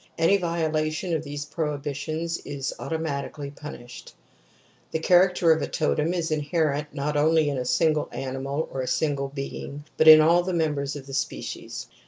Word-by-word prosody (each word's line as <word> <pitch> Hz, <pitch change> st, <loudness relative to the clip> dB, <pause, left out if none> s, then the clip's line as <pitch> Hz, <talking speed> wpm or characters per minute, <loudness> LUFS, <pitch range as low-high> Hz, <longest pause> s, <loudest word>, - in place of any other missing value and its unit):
Any 165 Hz, +5 st, +4 dB
violation 160 Hz, -1 st, -1 dB
of 160 Hz, -1 st, -1 dB
these 145 Hz, -1 st, -5 dB
prohibitions 150 Hz, +2 st, -3 dB
is 140 Hz, -2 st, -4 dB
automatically 145 Hz, -3 st, -4 dB
punished. 130 Hz, -4 st, -10 dB, 0.7 s
The -, -, -1 dB
character 180 Hz, 0 st, +4 dB
of 160 Hz, -, +3 dB
a -, -, -1 dB
totem 155 Hz, 0 st, 0 dB
is 170 Hz, -2 st, -2 dB
inherent 150 Hz, -1 st, 0 dB
not 150 Hz, +1 st, -2 dB
only 155 Hz, +1 st, +3 dB
in 140 Hz, -, -2 dB
a 125 Hz, -, -3 dB
single 150 Hz, +5 st, +2 dB
animal 135 Hz, +3 st, -3 dB
or 135 Hz, -, -3 dB
a 130 Hz, -, -4 dB
single 140 Hz, -2 st, 0 dB
being 140 Hz, +1 st, -6 dB
but 155 Hz, -, +4 dB
in 155 Hz, 0 st, +12 dB
all 165 Hz, +3 st, +5 dB
the 185 Hz, +1 st, -3 dB
members 150 Hz, -4 st, -1 dB
of 140 Hz, -2 st, -8 dB
the 135 Hz, -, -10 dB
species. 135 Hz, -, -4 dB
150 Hz, 165 wpm, -25 LUFS, 140-160 Hz, 0.7 s, in